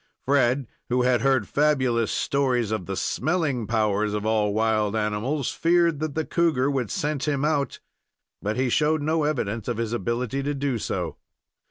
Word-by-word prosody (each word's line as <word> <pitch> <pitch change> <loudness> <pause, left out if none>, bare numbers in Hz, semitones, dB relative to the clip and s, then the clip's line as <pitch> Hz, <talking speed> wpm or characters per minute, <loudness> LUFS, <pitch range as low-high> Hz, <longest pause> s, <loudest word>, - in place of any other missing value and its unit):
Fred, 130 -1 +2 0.2
who 125 0 +2
had 125 -2 +3
heard 130 -4 +2
fabulous 130 -6 +1
stories 130 -6 0
of 110 -5 -3
the 95 - -3
"smelling" 145 - -1
powers 105 -2 +1
of 105 0 -3
all 110 -2 +2
wild 110 0 +1
animals, 110 +6 -1
feared 170 -2 +2
that 155 -2 -3
the 160 -1 -1
cougar 155 -6 +1
would 130 -6 -1
scent 150 -1 -2
him 145 -1 0
out, 145 -4 0 0.6
but 105 +3 -2
he 130 0 +1
showed 150 +4 +2
no 155 0 +1
evidence 115 -7 -2
of 120 -3 -2
his 115 -1 -2
ability 120 +4 -2
to 145 +1 -2
do 135 -4 -1
so. - - -3
125 Hz, 170 wpm, -25 LUFS, 110-145 Hz, 0.6 s, had